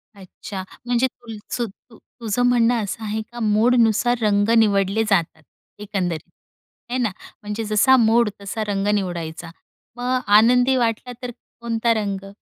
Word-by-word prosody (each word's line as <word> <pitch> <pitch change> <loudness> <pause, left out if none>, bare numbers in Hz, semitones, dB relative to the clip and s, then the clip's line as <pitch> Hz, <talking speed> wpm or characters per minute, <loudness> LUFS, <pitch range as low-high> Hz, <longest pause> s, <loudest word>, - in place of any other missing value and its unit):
अच्छा! 190 0 -8 0.2
म्हणजे 245 +1 +2
तुलसूतू 230 -1 -8
तुझं 230 0 -4
म्हणणं 240 -2 +3
असं 215 +2 -5
आहे 215 +1 -2
का 240 - -8
मूडनुसार 230 +2 +3
रंग 205 0 +2
निवडले 205 0 +2
जातात 165 -4 0 0.4
एकंदरीत, 180 -6 -3 0.6
है 255 - 0
ना. 240 -4 +1 0.3
म्हणजे 210 +2 -4
जसा 215 +5 +4
मूड 230 -1 +3
तसा 205 +2 -4
रंग 200 0 -1
निवडायचा. 170 -4 -3 0.5
मग 250 +1 0 0.2
आनंदी 250 +3 +4
वाटला 235 0 -1
तर 250 -1 -5 0.3
कोणता 230 0 +1
रंग? 195 -2 -3
220 Hz, 130 wpm, -21 LUFS, 200-240 Hz, 0.6 s, जसा